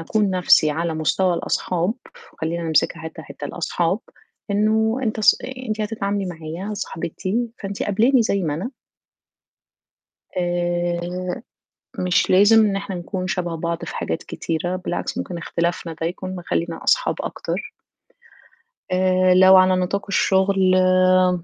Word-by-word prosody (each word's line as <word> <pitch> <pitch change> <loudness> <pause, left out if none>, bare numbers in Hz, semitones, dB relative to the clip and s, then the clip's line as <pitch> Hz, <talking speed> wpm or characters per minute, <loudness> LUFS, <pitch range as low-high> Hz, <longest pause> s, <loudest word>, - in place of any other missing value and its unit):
أكون 205 +4 0
نفْسي 175 -4 +4
على 165 +1 -2
مستوى 160 +4 +1
الأصحاب، 180 +4 -1 0.4
وخلّينا 170 +2 -3
نمسكها 160 +1 +1
حتّة، 160 - -8
حتّة - - -9
الأصحاب، - - -1 0.5
إنه 220 +3 +2
أنت 220 -2 -1
ص - - +6
أ - - -4 0.2
أنتِ 215 0 -2
هتتعاملي 205 -2 -2
معايا 175 +4 -6
صاحبتي 200 +5 -3
فأنتِ 195 0 -5
قابلاني 230 +5 +3
زي 200 -3 0
ما 150 -3 -1
أنا 195 - -4 1.7
آآ 175 +1 -2 0.6
مش 180 -1 +1
لازم 210 +4 +6
إن 195 -1 0
إحنا 195 -1 -4
نكون 185 +1 -4
شبه 175 -3 -2
بعض 170 +1 -3
في - - -7
حاجات - - -3
كتيرة، 175 +2 -3
بالعكس 180 -1 -4
ممكن 175 -2 -4
اختلافنا 170 0 -2
ده 165 - 0
يكون 185 +2 -5
مخلِّينا 170 -1 -3
أصحاب - - +2
أكتر - - -4 1.3
آآ 185 0 +3
لو 190 +1 +7
على 185 0 +5
نطاق 185 +2 -1
الشغل 190 -1 +3
آمم 185 -1 +4
185 Hz, 135 wpm, -22 LUFS, 170-200 Hz, 1.7 s, لو